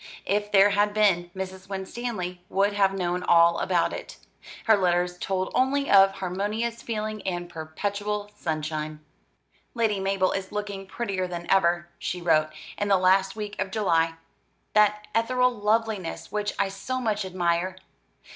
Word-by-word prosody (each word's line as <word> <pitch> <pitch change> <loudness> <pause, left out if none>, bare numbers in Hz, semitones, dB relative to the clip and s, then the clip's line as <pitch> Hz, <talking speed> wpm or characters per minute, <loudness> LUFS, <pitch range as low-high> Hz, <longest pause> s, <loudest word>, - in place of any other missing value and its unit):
If 205 +1 0
there 200 0 +6
had 205 +1 +2
been, 185 -5 +3
Mrs. 190 0 -6
Winstanley 190 -2 -4
would 200 +1 +2
have 195 -1 +3
known 180 -2 -1
all 170 -1 +5
about 175 -3 +1
it. - - -8 0.5
Her 220 - +6
letters 180 -2 +1
told 190 0 -2
only 275 +2 +1
of 195 -1 +7
harmonious 210 +6 -3
feeling 215 -2 -4
and 175 -2 -3
perpetual 205 +6 -4
sunshine. 155 -1 -3 0.7
"Lady 220 -4 +1
Mabel 195 -1 +1
is 190 -1 -4
looking 205 -2 -5
prettier 195 -4 -2
than 175 -1 -6
ever," 175 -2 +3
she 180 - -3
wrote, 155 -3 +3 0.3
in 205 - 0
the 195 -1 +4
last 190 +1 +3
week 210 -2 -5
of 190 - -2
July, 165 -6 +1 0.6
"that 210 0 +3
ethereal 250 +2 +2
loveliness 215 -5 -1
which 210 0 -2
I 200 - +2
so 225 +7 -4
much 215 -4 -1
admire. 180 0 0
195 Hz, 145 wpm, -26 LUFS, 180-210 Hz, 0.7 s, of